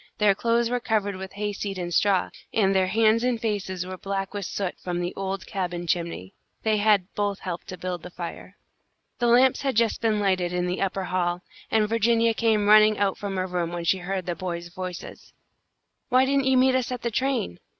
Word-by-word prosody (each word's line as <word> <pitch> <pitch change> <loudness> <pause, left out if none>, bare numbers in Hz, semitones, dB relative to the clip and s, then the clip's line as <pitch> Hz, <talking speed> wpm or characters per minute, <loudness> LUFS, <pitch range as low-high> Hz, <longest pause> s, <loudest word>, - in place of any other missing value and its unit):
Their 210 -2 +4
clothes 230 +3 +1
were 245 - +1
covered 210 -4 0
with 190 0 -8
hayseed 205 -1 -3
and 175 -1 -4
straw, 195 +1 +2 0.2
and 195 -3 +2
their 190 -1 +3
hands 225 +3 +3
and 250 -2 +1
faces 195 -5 -2
were 185 0 -7
black 195 0 -3
with 200 -3 -4
soot 195 -3 -3
from 175 -1 -3
the 175 0 -2
old 195 0 -4
cabin 175 -3 -3
chimney. 170 - -2 0.3
They 220 -1 +2
had 205 -3 +2
both 205 -1 -1
helped 175 -2 -5
to 185 - -7
build 180 -1 -4
the 180 - -9
fire. 180 +2 -8 0.6
The 240 - +2
lamps 250 +2 +5
had 270 -3 -1
just 230 0 +2
been 220 -2 +1
lighted 185 -3 +1
in 180 0 0
the 180 +1 -2
upper 195 0 -1
hall, 180 -1 -1 0.3
and 215 -1 +2
Virginia 230 +1 +2
came 220 -2 +1
running 215 0 +7
out 200 -2 0
from 200 -2 -4
her 185 - 0
room 175 -2 -2
when 175 -1 -4
she 185 +3 +2
heard 185 0 -3
the 175 - -1
boys' 175 0 -5
voices. 185 -2 -8 0.8
"Why 255 +1 +5
didn't 275 0 +1
you 265 -1 +4
meet 260 +1 +4
us 255 -1 0
at 250 -1 -4
the 235 - -1
train?" 250 - -1
195 Hz, 210 wpm, -25 LUFS, 180-225 Hz, 0.8 s, running